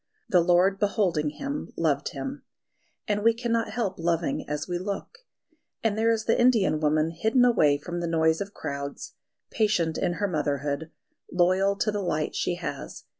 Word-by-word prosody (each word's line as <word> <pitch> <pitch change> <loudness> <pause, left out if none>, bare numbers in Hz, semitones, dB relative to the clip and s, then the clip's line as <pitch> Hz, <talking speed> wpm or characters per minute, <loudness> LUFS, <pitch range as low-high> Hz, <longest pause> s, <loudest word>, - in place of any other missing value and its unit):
"The 180 - +5
Lord 180 +3 +3
beholding 185 -7 +1
him 280 - -5
loved - - +1
him," - - -6 0.6
and 210 0 0
we 230 0 +4
cannot 230 -1 -1
help 210 -4 -2
loving 165 -4 -1
as 150 0 -3
we 175 -1 -2
look. 200 - -5 0.6
And 220 -2 +1
there 225 +1 +2
is 225 -1 +1
the 230 - +2
Indian 225 -10 +3
woman 155 +1 +2
hidden 220 +9 +2
away 155 -12 +4
from 175 +4 -5
the 170 - -2
noise 160 0 +2
of 200 0 -4
crowds, 140 -5 -6 0.4
patient 190 -8 +1
in 175 - 0
her 205 +3 -1
motherhood, 145 -2 -2 0.4
loyal 185 +3 +3
to 215 +2 0
the 205 -1 -2
light 155 -4 -1
she 175 - 0
has. 175 -2 -6
180 Hz, 170 wpm, -26 LUFS, 160-215 Hz, 0.6 s, The